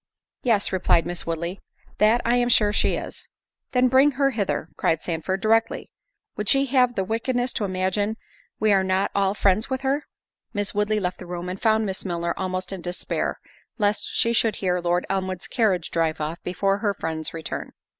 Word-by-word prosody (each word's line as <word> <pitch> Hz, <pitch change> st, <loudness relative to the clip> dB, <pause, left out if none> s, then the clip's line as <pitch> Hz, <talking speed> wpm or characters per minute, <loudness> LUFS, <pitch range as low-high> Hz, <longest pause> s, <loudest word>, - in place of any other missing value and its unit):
"Yes," 225 Hz, -5 st, +2 dB
replied 175 Hz, -3 st, +3 dB
Miss 175 Hz, -1 st, -5 dB
Woodley, 170 Hz, +3 st, -3 dB, 0.4 s
"that 220 Hz, +3 st, +4 dB
I 235 Hz, +1 st, +3 dB
am 245 Hz, 0 st, +2 dB
sure 210 Hz, -3 st, +4 dB
she -, -, +2 dB
is." -, -, -7 dB, 0.4 s
"Then 250 Hz, 0 st, +4 dB
bring 265 Hz, +3 st, +5 dB
her 275 Hz, +1 st, +2 dB
hither," 210 Hz, -6 st, -2 dB
cried 160 Hz, -, +1 dB
Sandford, 180 Hz, +4 st, -2 dB
"directly. 225 Hz, +1 st, +1 dB, 0.4 s
Would 210 Hz, -, -1 dB
she 275 Hz, 0 st, +4 dB
have 250 Hz, -2 st, +3 dB
the 195 Hz, -, 0 dB
wickedness 245 Hz, +4 st, -1 dB
to 210 Hz, -, -1 dB
imagine 190 Hz, +3 st, -1 dB, 0.4 s
we 215 Hz, -1 st, +4 dB
are 190 Hz, -1 st, +4 dB
not 190 Hz, +1 st, +1 dB
all 200 Hz, 0 st, +1 dB
friends 200 Hz, +1 st, +2 dB
with 260 Hz, 0 st, -2 dB
her?" 275 Hz, +2 st, -1 dB, 0.5 s
Miss 205 Hz, -1 st, -1 dB
Woodley 210 Hz, +1 st, +1 dB
left 180 Hz, -2 st, -3 dB
the 180 Hz, -, -9 dB
room, 175 Hz, 0 st, -5 dB
and 185 Hz, +1 st, -6 dB
found 220 Hz, -1 st, +3 dB
Miss 190 Hz, -2 st, -3 dB
Milner 170 Hz, -2 st, -2 dB
almost 185 Hz, 0 st, -3 dB
in 190 Hz, -2 st, -5 dB
despair, 175 Hz, +1 st, -2 dB, 0.4 s
lest 210 Hz, -2 st, +1 dB
she 230 Hz, -, +2 dB
should 225 Hz, -1 st, +2 dB
hear 180 Hz, -2 st, 0 dB
Lord 175 Hz, +1 st, 0 dB
Elmwood's 190 Hz, -1 st, -2 dB
carriage 200 Hz, -9 st, 0 dB
drive 160 Hz, -1 st, 0 dB
off 155 Hz, +2 st, -4 dB
before 195 Hz, +3 st, 0 dB
her 205 Hz, -2 st, 0 dB
friend's 160 Hz, -2 st, -3 dB
return. 165 Hz, -1 st, -6 dB
195 Hz, 185 wpm, -24 LUFS, 180-225 Hz, 0.5 s, bring